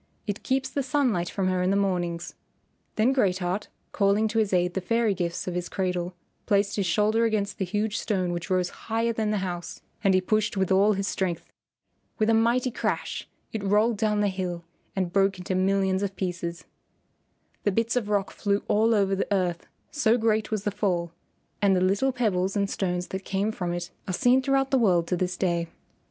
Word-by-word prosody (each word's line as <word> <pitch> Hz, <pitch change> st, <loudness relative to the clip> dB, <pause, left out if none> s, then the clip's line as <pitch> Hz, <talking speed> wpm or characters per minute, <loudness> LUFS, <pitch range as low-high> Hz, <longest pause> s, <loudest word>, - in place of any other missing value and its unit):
It 205 Hz, -1 st, -3 dB
keeps 265 Hz, 0 st, 0 dB
the 280 Hz, -, -2 dB
sunlight 255 Hz, -, +1 dB
from 195 Hz, -2 st, -1 dB
her 185 Hz, -1 st, +1 dB
in 180 Hz, -, +1 dB
the 195 Hz, -, +2 dB
mornings." 175 Hz, -4 st, -1 dB, 0.6 s
Then 230 Hz, +5 st, +3 dB
Great 195 Hz, -9 st, +2 dB
Heart, 185 Hz, +3 st, -2 dB, 0.2 s
calling 200 Hz, +2 st, +2 dB
to 225 Hz, +1 st, 0 dB
his 215 Hz, -2 st, +1 dB
aid 180 Hz, -1 st, +2 dB
the 190 Hz, -, -2 dB
fairy 230 Hz, +2 st, +1 dB
gifts 175 Hz, -1 st, -3 dB
of 180 Hz, -, -2 dB
his 175 Hz, 0 st, -3 dB
cradle, 180 Hz, -2 st, -2 dB, 0.3 s
placed 200 Hz, 0 st, +2 dB
his 200 Hz, -3 st, 0 dB
shoulder 215 Hz, +4 st, +2 dB
against 215 Hz, -3 st, 0 dB
the 190 Hz, -, 0 dB
huge 210 Hz, +3 st, -1 dB
stone 185 Hz, -5 st, -1 dB
which 175 Hz, +3 st, -4 dB
rose 185 Hz, -1 st, +1 dB, 0.2 s
higher 230 Hz, +1 st, +1 dB
than 220 Hz, -1 st, -1 dB
the 210 Hz, -, +1 dB
house, 175 Hz, -2 st, -6 dB, 0.2 s
and 195 Hz, -2 st, +4 dB
he -, -, +5 dB
pushed 210 Hz, +2 st, 0 dB
with 190 Hz, -1 st, +1 dB
all 200 Hz, +3 st, +5 dB
his 195 Hz, 0 st, -2 dB
strength. 180 Hz, -3 st, -2 dB, 0.7 s
With 220 Hz, 0 st, +2 dB
a -, -, +4 dB
mighty 235 Hz, +3 st, +2 dB
crash -, -, -3 dB, 0.2 s
it 220 Hz, -2 st, -3 dB
rolled 210 Hz, +3 st, +3 dB
down 210 Hz, 0 st, +1 dB
the 205 Hz, -, +3 dB
hill 180 Hz, -2 st, -4 dB, 0.3 s
and 185 Hz, -2 st, -1 dB
broke 195 Hz, -1 st, +3 dB
into 180 Hz, +1 st, -4 dB
millions 190 Hz, 0 st, +2 dB
of 200 Hz, -1 st, -2 dB
pieces. 170 Hz, -3 st, -4 dB, 1.0 s
The 205 Hz, -, +1 dB
bits 230 Hz, +4 st, 0 dB
of 225 Hz, -4 st, 0 dB
rock 205 Hz, -2 st, 0 dB
flew 200 Hz, -1 st, -1 dB
all 225 Hz, +2 st, +3 dB
over 195 Hz, -2 st, +2 dB
the 195 Hz, -, -3 dB
earth 180 Hz, -3 st, 0 dB, 0.2 s
so 245 Hz, -6 st, +3 dB
great 220 Hz, -2 st, +1 dB
was 215 Hz, -2 st, -2 dB
the 205 Hz, -, 0 dB
fall, 180 Hz, -4 st, -1 dB, 0.5 s
and 200 Hz, -2 st, +4 dB
the -, -, +3 dB
little 195 Hz, +9 st, +2 dB
pebbles 200 Hz, -6 st, 0 dB
and 200 Hz, -1 st, +1 dB
stones 180 Hz, -2 st, -2 dB
that 190 Hz, 0 st, -4 dB
came 200 Hz, +3 st, -1 dB
from 180 Hz, -5 st, -3 dB
it 175 Hz, 0 st, -4 dB, 0.2 s
are 185 Hz, -, -2 dB
seen 250 Hz, +5 st, +4 dB
throughout 270 Hz, 0 st, +1 dB
the 265 Hz, -, +4 dB
world 180 Hz, -7 st, +3 dB
to 180 Hz, -, +2 dB
this 180 Hz, 0 st, -2 dB
day. 170 Hz, -2 st, 0 dB
195 Hz, 205 wpm, -26 LUFS, 180-215 Hz, 1.0 s, he